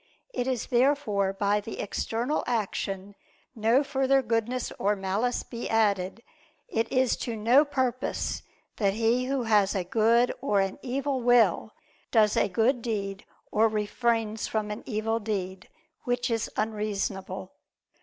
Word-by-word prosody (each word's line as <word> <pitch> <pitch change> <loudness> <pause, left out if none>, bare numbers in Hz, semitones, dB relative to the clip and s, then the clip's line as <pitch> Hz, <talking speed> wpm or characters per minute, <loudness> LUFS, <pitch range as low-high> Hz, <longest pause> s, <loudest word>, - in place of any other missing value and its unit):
If 250 -1 -1
therefore 240 -7 +2
by 200 +1 +1
the 220 +2 -7
external 230 +7 -1
action 205 -4 -2 0.4
no 230 +5 +3
further 270 -1 +2
goodness 235 +2 -1
or 205 +2 +2
malice 200 +6 -1
be 235 0 -6
added, 205 -1 +1 0.4
it 225 0 -1
is 255 -2 +3
to 235 - -4
no 235 +7 +5
purpose 260 -3 -2 0.4
that 200 -2 +1
he 230 +3 +2
who 265 -1 -1
has 210 -3 +3
a 190 - 0
good 230 +6 +3
or 210 -7 +2
an 195 +4 -1
evil 270 +1 -2
will, 230 -4 +3 0.4
does 215 -2 +4
a - - +2
good 230 +6 +2
deed 200 -4 -3 0.3
or 220 +2 +4
refrains 220 +1 -1
from 215 -1 -2
an 210 - -5
evil 225 0 -1
deed. 190 -4 -4 0.4
Which 245 -1 0
is 225 -1 -1
unreasonable. 205 -3 -3
225 Hz, 135 wpm, -27 LUFS, 205-245 Hz, 0.4 s, no